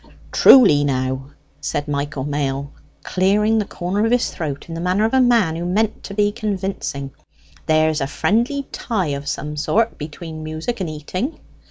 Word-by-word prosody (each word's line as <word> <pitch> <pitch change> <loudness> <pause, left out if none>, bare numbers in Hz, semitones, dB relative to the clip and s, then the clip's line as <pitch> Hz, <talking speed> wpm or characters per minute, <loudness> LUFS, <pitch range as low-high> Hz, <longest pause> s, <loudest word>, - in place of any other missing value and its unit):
"Truly, 190 - +7
now," 130 -1 -1 0.3
said 145 - -3
Michael 145 -1 -2
Mail, 140 -1 -2 0.3
clearing 210 +4 +2
the 210 - -1
corner 190 +3 -2
of 225 - +1
his 245 0 +2
throat 145 -4 -5
in 165 - -7
the 165 - -4
manner 185 +4 +2
of 225 - -1
a 265 - +5
man 230 -10 +3
who 170 - -4
meant 205 +5 0
to 200 - -7
be 205 0 +2
convincing; 195 -10 -3 0.6
"there's 155 0 +3
a 135 - 0
friendly 240 - 0
tie 195 -9 -2
of 140 0 -4
some 150 +1 -3
sort 220 +10 0
between 155 +1 -7
music 155 +9 -4
and 175 - -2
eating." 180 - -4
170 Hz, 170 wpm, -20 LUFS, 145-215 Hz, 0.6 s, Truly